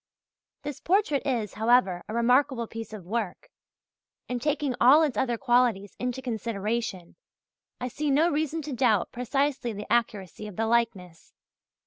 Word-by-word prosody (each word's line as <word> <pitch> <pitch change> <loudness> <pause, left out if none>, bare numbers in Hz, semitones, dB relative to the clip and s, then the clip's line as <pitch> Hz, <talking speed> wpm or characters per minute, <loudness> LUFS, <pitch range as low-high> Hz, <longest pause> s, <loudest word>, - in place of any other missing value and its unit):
This 290 -2 -5
portrait 360 -6 +1
is, 230 -6 -1
however, 220 -5 +2
a - - -4
remarkable 245 +1 +2
piece 225 0 -8
of 210 -5 -9
work, 215 -1 -4 0.8
and 250 -1 -3
taking 295 -1 0
all 280 +6 +7
its 290 -7 0
other 240 0 0
qualities 235 -5 +1
into 250 +1 -3
consideration, 220 -5 -3 0.6
I 250 - -3
see 295 +4 -3
no 295 +5 +4
reason 315 0 -1
to 290 -1 -5
doubt 230 -6 +2
precisely 255 0 -1
the 205 0 -6
accuracy 215 -3 -1
of 210 - -9
the 225 - 0
likeness. 210 -8 -1
235 Hz, 145 wpm, -27 LUFS, 215-270 Hz, 0.8 s, all